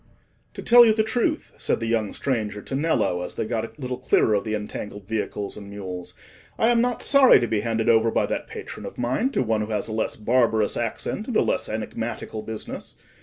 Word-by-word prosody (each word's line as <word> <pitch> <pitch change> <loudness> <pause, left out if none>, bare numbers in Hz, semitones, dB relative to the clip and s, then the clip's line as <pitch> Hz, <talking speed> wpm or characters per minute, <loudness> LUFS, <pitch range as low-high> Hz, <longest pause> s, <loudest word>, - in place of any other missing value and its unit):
"To - - -7
tell 240 0 +8
you 225 -2 +5
the 220 - +3
truth," 240 +8 -1
said - - 0
the 115 - -3
young 115 -2 0
stranger 105 -6 -2
to - - -7
Nello, 135 - +1
as 90 - -6
they - - -2
got 110 0 -2
a 135 - -14
little 125 -2 -4
clearer 110 - +3
of 100 - +1
the 110 -1 -2
entangled 105 -1 -6
vehicles 105 -2 -3
and 100 -1 -9
mules, 95 -3 -7 0.4
"I 225 - +3
am 235 -1 +4
not 245 0 -1
sorry 275 -2 +7
to 120 - 0
be 110 - 0
handed 115 0 -1
over 115 -1 +5
by - - +1
that - - -3
patron - - -8
of - - -10
mine 130 - 0
to - - +1
one 110 -2 0
who 105 - -2
has 105 -2 -1
a 110 - -5
less 110 - -1
barbarous 110 -1 +2
accent, 120 - -3
and 245 - 0
a - - +4
less - - -1
enigmatical 110 0 -4
business. 110 0 -7
115 Hz, 220 wpm, -24 LUFS, 105-135 Hz, 0.4 s, tell